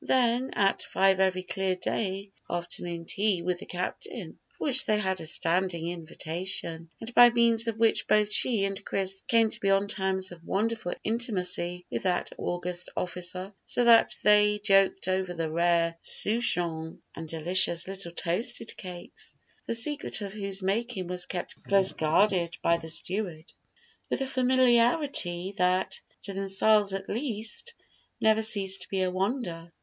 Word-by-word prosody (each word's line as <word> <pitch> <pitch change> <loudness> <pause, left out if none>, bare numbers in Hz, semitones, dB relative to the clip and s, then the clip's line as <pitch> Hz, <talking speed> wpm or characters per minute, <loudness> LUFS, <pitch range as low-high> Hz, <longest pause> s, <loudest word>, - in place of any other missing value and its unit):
Then, 250 0 +2
at 195 -1 +2
five 190 0 +2
every 185 -1 +1
clear 190 0 -1
day, 195 +1 -3 0.2
afternoon 175 -1 -4
tea 195 -1 0
with 180 0 -1
the 205 - -10
captain, 180 0 -6 0.2
for - - -6
which 265 -2 +3
they 215 - +3
had 190 -4 -1
a 160 - -5
standing 170 0 0
invitation, 170 0 -3
and 225 +1 -7
by 240 0 +9
means 235 -1 +3
of 225 -1 -2
which 225 0 +2
both 210 0 +3
she 220 -6 +3
and 195 0 -4
Chris 195 0 -2
came 225 -2 +3
to - - 0
be 195 - 0
on 195 +1 +3
terms 190 -2 0
of 170 -1 -12
wonderful 215 -1 -2
intimacy 180 -6 -1
with - - -2
that 180 -2 -1
august 175 0 -3
officer, 180 +2 -4
so 245 - +1
that 235 -1 +6
they 210 0 +4
joked 195 -2 +3
over 185 -1 -1
the 165 -2 -3
rare 170 0 +1
souchong 175 -8 0 0.2
and 165 -1 -8
delicious 170 +1 +2
little 190 -3 -7
toasted 210 +8 -2
cakes 180 -3 -9 0.3
(the 230 - -1
secret 285 +4 -1
of 200 -1 -5
whose 195 -2 -4
making 205 0 -1
was 180 0 -3
kept 180 - -6
close 195 -1 +4
guarded 170 +2 +1
by 170 - +4
the 165 -1 -7
steward) 170 -1 -4 0.6
with - - -1
a - - +1
familiarity 250 - +2
that, 180 +1 +1 0.2
to 200 - -5
themselves 195 +1 +3
at 195 0 -6
least, 230 - -3 0.4
never 220 0 +3
ceased 195 -3 +2
to - - -6
be 190 -1 0
a 185 - 0
wonder. 185 -4 -3
190 Hz, 155 wpm, -28 LUFS, 175-220 Hz, 0.6 s, by